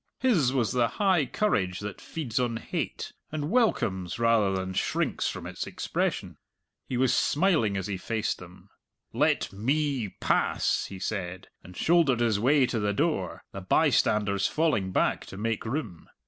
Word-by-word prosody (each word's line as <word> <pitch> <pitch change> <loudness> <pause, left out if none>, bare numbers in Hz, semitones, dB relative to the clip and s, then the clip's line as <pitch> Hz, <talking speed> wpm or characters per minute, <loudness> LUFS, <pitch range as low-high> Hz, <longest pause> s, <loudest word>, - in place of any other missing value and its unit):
His 180 - +3
was 120 -6 +1
the 120 -2 +2
high 185 -9 +3
courage 95 - 0
that 105 -1 -6
feeds 130 -7 -3
on 120 -2 0
hate, - - -4 0.2
and 150 +1 -3
welcomes 95 - +1
rather 115 -4 +3
than 95 0 -2
shrinks - - 0
from - - -6
its - - -5
expression. - - -2 0.5
He 125 - -1
was 130 0 +3
smiling 150 - +2
as 95 - -3
he 100 -1 -3
faced 110 +3 -2
them. 90 0 -14 0.4
"Let - - +1
me 135 +1 0
pass," - - +1
he 95 - -8
said, 95 -2 -4
and 90 0 -12
shouldered 160 -7 +3
his 115 -4 +2
way 135 +4 +4
to 120 -2 -2
the 105 -1 0
door, - - -1
the - - -7
bystanders 100 -2 +2
falling 150 -13 0
back - - 0
to 95 - -9
make 115 +1 -2
room. 110 - -4
115 Hz, 160 wpm, -27 LUFS, 100-145 Hz, 0.5 s, way